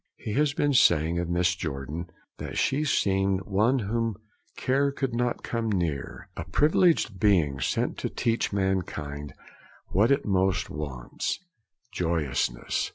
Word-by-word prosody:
He 105 - -5
has 145 +2 +2
been 145 -1 +2
saying 85 - +4
of 85 - -2
Mrs. 85 0 +1
Jordan, 75 +3 -4 0.3
that - - -5
'she 145 +3 +1
seemed 95 -6 +2
one 105 +7 +2
whom 115 0 -1 0.4
care 140 +2 +2
could 135 -3 -2
not 120 0 -1
come 115 -1 -2
near; 85 -7 -2
a - - -4
privileged 155 - +2
being, 85 -11 +3
sent - - -1
to - - -2
teach 115 -1 0
mankind 80 -8 -2 0.5
what 105 +6 +3
it 140 - +2
most 95 -2 +1
wants, 70 -5 -4 0.6
joyousness.' 75 -8 -1
95 Hz, 135 wpm, -27 LUFS, 80-115 Hz, 0.6 s, saying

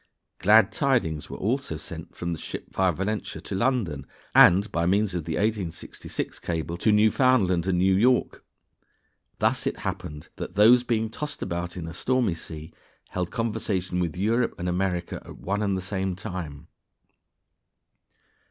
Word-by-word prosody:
Glad 105 +1 +6
tidings 115 - 0
were - - -6
also 115 - -1
sent - - -9
from 85 0 -3
the 80 - -6
ship - - -7
via 95 -1 +3
Valentia 95 +6 -3
to - - -7
London, 95 - 0 0.3
and, 100 +5 +6
by 85 0 0
means 100 +1 +2
of 85 -4 -3
the 80 0 -2
1866 105 -6 -3
cable, 85 0 -3
to 110 - +2
Newfoundland 105 -4 +3
and 95 -2 +2
New 95 +2 +4
York. 120 +6 +2 0.9
Thus - - +1
it - - -3
happened 75 0 -5
that - - -6
those 115 +5 +7
being 110 -2 0
tossed 150 +4 -5
about 85 0 -4
in 85 - -4
a 80 - -7
stormy 125 -1 +1
sea 80 0 -8 0.4
held 90 -1 -2
conversation 105 -5 -2
with 85 -2 -2
Europe 115 +5 +1
and 90 - -3
America 90 -1 -1
at - - -11
one 100 +2 -2
and 100 -2 0
the 95 - -4
same 95 -1 -2
time. 80 -5 -6
95 Hz, 155 wpm, -26 LUFS, 85-110 Hz, 0.9 s, those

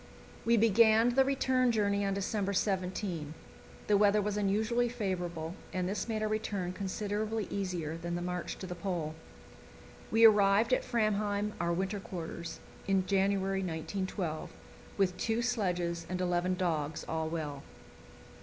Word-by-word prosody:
We 235 0 +4
began 225 +1 +5
the 265 +2 +4
return 260 -2 +2
journey 205 -2 +1
on 195 -1 0
December 200 0 -1
17. 185 -5 -1 0.5
The 210 - +4
weather 205 +1 +4
was 205 0 -1
unusually 220 +4 +1
favourable, 175 -8 -3 0.2
and 185 -1 -1
this 200 +5 -2
made 215 -1 -1
our - - +1
return 205 -4 -2
considerably 210 +3 -2
easier 175 -5 -2
than 170 +1 -4
the 175 - -3
march 180 0 -3
to - - -6
the 180 - -5
Pole. 175 -4 -3 1.0
We 225 +1 +6
arrived 210 +2 +5
at - - +2
"Framheim," 210 -2 0
our 170 0 +1
winter 190 +4 -1
quarters, 170 -2 -6 0.3
in 195 -1 +2
January, 195 0 +1
1912, 180 -1 -3 0.5
with 190 -2 +2
two 230 +1 0
sledges 180 -8 -1
and 180 0 -2
eleven 180 0 +1
dogs, 160 -4 -1
all 160 0 -1
well. 150 -4 -4
195 Hz, 145 wpm, -32 LUFS, 175-215 Hz, 1.0 s, We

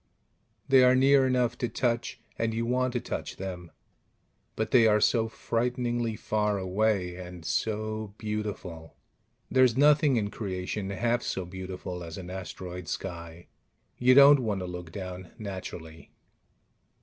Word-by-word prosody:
They 130 -1 +6
are 125 0 +6
near 135 0 +5
enough 125 -2 +1
to 120 - -1
touch, 120 0 -1 0.2
and 115 -1 -1
you 115 +1 -1
want 130 +1 0
to 120 - 0
touch - - -5
them, 90 -3 -6 0.9
but 110 0 -2
they 115 -3 +6
are 105 -1 +4
so 115 +1 +2
frighteningly 120 0 -1
far 105 -1 0
away... 95 -1 0
and 90 -2 -9
so 110 -1 -2
beautiful: 105 -7 -5 0.6
there's 130 -2 +4
nothing 145 -1 +5
in 100 -2 -1
creation 95 0 -4
half 120 +5 0
so 95 - -3
beautiful 90 -1 -6
as 80 -1 -8
an 90 -1 -7
asteroid 90 -2 -7
sky. 85 0 -6 0.5
You 125 +1 +5
don't 140 +1 +9
want 105 -6 -2
to - - -3
look 90 -2 -7
down, 90 -1 -7
naturally. 90 -5 -8
105 Hz, 140 wpm, -28 LUFS, 90-120 Hz, 0.9 s, don't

